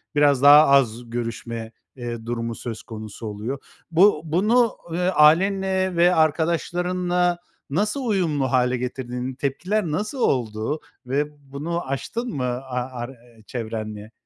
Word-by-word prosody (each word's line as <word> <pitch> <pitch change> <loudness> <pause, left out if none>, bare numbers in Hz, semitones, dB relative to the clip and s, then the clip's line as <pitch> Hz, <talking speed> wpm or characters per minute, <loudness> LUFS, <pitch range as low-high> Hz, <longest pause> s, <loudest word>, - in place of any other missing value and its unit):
biraz 145 -3 +4
daha 145 +2 +9
az 120 -4 +3
görüşme, 115 -1 -4 0.2
eee, 120 -3 -6
durumu 115 0 -3
söz 115 -1 -6
konusu 110 -1 -8
oluyor. 110 +6 -4 0.3
Bu 170 -1 +5
bunu, 215 +9 +2
ııı, 180 +2 +1
ailenle 190 +4 +3
ve 175 +1 +4
arkadaşlarınla 175 +2 +1 0.3
nasıl 210 - -1
uyumlu 160 - 0
hâle 125 -1 +2
getirdin? 125 0 -4
Tepkiler 175 +10 -1
nasıl 210 - -2
oldu 115 - 0 0.3
ve 140 +4 0 0.3
bunu 165 +3 -3
aştın 230 - -3
mı, 130 - -2
a 125 0 -2
a 125 +1 -2
ar 120 0 -5 0.4
çevrenle? 110 -2 -5
140 Hz, 125 wpm, -23 LUFS, 120-175 Hz, 0.4 s, daha